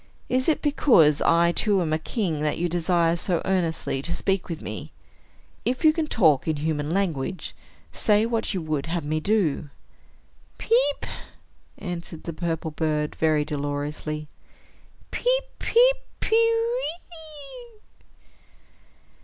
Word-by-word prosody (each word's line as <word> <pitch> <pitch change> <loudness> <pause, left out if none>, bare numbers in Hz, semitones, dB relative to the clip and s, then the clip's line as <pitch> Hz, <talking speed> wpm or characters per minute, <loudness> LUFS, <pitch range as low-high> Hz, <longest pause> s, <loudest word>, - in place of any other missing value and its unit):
Is 255 +4 +2
it 315 - +1
because 230 - +4
I 170 +1 +4
too 200 +2 +2
am 160 -3 0
a 155 - +1
king, 165 -2 -2
that 150 0 0
you 175 - 0
desire 170 0 +2
so 175 0 0
earnestly 170 -7 0
to 170 +4 -2
speak 190 +1 -1
with 165 -2 -4
me? - - -7 0.7
If 255 +6 -1
you 310 - +7
can 315 -1 -1
talk 160 - +3
in 160 - +1
human 150 0 -2
language, 180 -3 -2 0.4
say 210 -1 +3
what 230 -1 -1
you 185 -5 -2
would 155 -2 -2
have 165 -2 -2
me 155 +1 0
do." 165 -6 0 0.9
"Peep!" 455 - +2 0.7
answered 175 -3 -6
the 170 - -5
purple 165 -1 -3
bird, 150 -1 -1
very 155 -2 +2
dolorously. 150 +1 -3 0.8
"Peep, - - +1 0.2
peep, - - +4 0.2
pe - - -3
we 460 +2 +2 0.3
e!" 325 - -9
170 Hz, 135 wpm, -25 LUFS, 155-255 Hz, 0.9 s, you